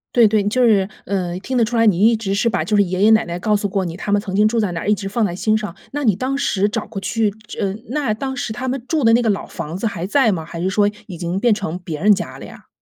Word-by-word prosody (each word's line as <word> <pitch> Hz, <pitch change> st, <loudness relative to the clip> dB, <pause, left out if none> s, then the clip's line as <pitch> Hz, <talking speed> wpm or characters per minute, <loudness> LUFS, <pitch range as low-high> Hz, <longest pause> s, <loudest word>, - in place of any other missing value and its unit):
对， 235 Hz, -3 st, +7 dB
对。 210 Hz, -1 st, +2 dB
就 250 Hz, +4 st, +2 dB
是， 200 Hz, -5 st, +4 dB, 0.2 s
呃， 180 Hz, -3 st, -2 dB
听 260 Hz, +5 st, -3 dB
得 235 Hz, -, +4 dB
出 235 Hz, +2 st, -2 dB
来， 230 Hz, -, +4 dB
你 205 Hz, 0 st, +4 dB
一 230 Hz, -, +4 dB
直 200 Hz, -3 st, -3 dB
是 225 Hz, +4 st, +1 dB
把 -, -, -1 dB
就 215 Hz, -, 0 dB
是 205 Hz, -, +5 dB
爷 185 Hz, +2 st, -1 dB
爷 220 Hz, -, +6 dB
奶 220 Hz, 0 st, +4 dB
奶 170 Hz, 0 st, -4 dB
告 210 Hz, +2 st, +1 dB
诉 205 Hz, 0 st, -1 dB
过 190 Hz, 0 st, -1 dB
你， 165 Hz, -1 st, -5 dB
他 205 Hz, -, -4 dB
们 205 Hz, -, +4 dB
曾 190 Hz, -2 st, -5 dB
经 210 Hz, +2 st, +4 dB
住 230 Hz, +1 st, 0 dB
在 205 Hz, -4 st, 0 dB
哪 165 Hz, -, -4 dB
一 210 Hz, -, +4 dB
直 200 Hz, -1 st, -4 dB
放 215 Hz, +3 st, 0 dB
在 175 Hz, -3 st, -3 dB
心 215 Hz, +3 st, +1 dB
上。 210 Hz, -5 st, -5 dB, 0.2 s
那 290 Hz, +1 st, -3 dB
你 215 Hz, -6 st, +3 dB
当 265 Hz, +6 st, -2 dB
时 205 Hz, -8 st, +1 dB
找 215 Hz, +1 st, -3 dB
过 195 Hz, -, -6 dB
去 205 Hz, +2 st, 0 dB, 0.2 s
这 -, -, -8 dB
呃， 195 Hz, -2 st, -1 dB
那 275 Hz, -5 st, 0 dB
当 265 Hz, +4 st, -4 dB
时 240 Hz, -3 st, -3 dB
他 245 Hz, +4 st, -4 dB
们 255 Hz, -1 st, -2 dB
住 315 Hz, -5 st, 0 dB
的 225 Hz, -, +5 dB
那 240 Hz, -, +4 dB
个 225 Hz, -, +1 dB
老 200 Hz, -, -1 dB
房 165 Hz, 0 st, -6 dB
子 215 Hz, -, -4 dB
还 185 Hz, -5 st, -2 dB
在 235 Hz, 0 st, +3 dB
吗？ 165 Hz, -4 st, -3 dB
还 170 Hz, +1 st, -7 dB
是 185 Hz, -, 0 dB
说 205 Hz, +1 st, +2 dB, 0.2 s
已 180 Hz, -5 st, -8 dB
经 175 Hz, +2 st, -2 dB
变 235 Hz, -1 st, +3 dB
成 180 Hz, -4 st, -3 dB
别 160 Hz, -3 st, -6 dB
人 210 Hz, 0 st, +6 dB
家 -, -, -6 dB
了 -, -, -9 dB
呀？ -, -, -14 dB
210 Hz, 340 characters per minute, -19 LUFS, 190-230 Hz, 0.2 s, 对